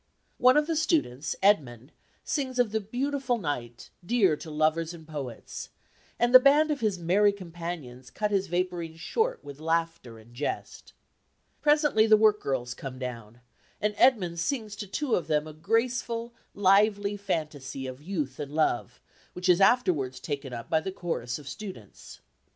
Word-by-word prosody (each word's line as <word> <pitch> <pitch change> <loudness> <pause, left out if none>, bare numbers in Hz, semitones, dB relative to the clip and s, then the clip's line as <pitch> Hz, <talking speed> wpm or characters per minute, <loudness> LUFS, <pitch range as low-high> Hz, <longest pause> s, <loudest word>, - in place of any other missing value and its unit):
One 255 +3 +6
of 300 - +3
the 325 +1 -1
students, 300 - 0
Edmund, 135 - +2 0.3
sings 260 -4 -2
of 245 -4 +2
the 220 0 0
beautiful 250 +3 -1
night 125 - -5
dear 195 -4 +3
to 160 - -10
lovers 160 +2 0
and 160 -2 -14
poets, 140 -7 -7 0.5
and 240 +1 +1
the 255 - +12
band 290 +4 +4
of 290 - -1
his 215 -4 0
merry 190 +5 +3
companions 165 -9 -7
cut 210 +9 -2
his 195 -1 +1
vapourings 175 -2 -2
short 460 - -1
with 140 0 -10
laughter 165 -7 -2
and 110 +2 -17
jest. 140 +4 -5 0.7
Presently 295 -7 +4
the 215 -1 +7
work 210 -1 +4
girls 125 -2 -2
come 130 0 -8
down, 120 -2 -7 0.4
and 210 0 0
Edmund 195 -9 +3
sings 220 - -2
to 205 - -6
two 260 +6 -2
of 165 - +1
them 150 -1 +1
a 155 - -9
graceful, 230 +6 -1 0.2
lively 205 +1 +3
fantasy 150 -9 -4
of 130 +1 -7
youth 150 -6 -4
and 145 -1 -5
love, 125 -5 0 0.3
which 180 +1 -4
is 180 +1 +5
afterwards 180 - +3
taken 140 -2 -5
up 115 -1 -6
by 160 - +2
the 190 +4 -4
chorus 125 -10 -3
of 145 -3 -12
students. 185 - -9
175 Hz, 160 wpm, -28 LUFS, 145-220 Hz, 0.7 s, the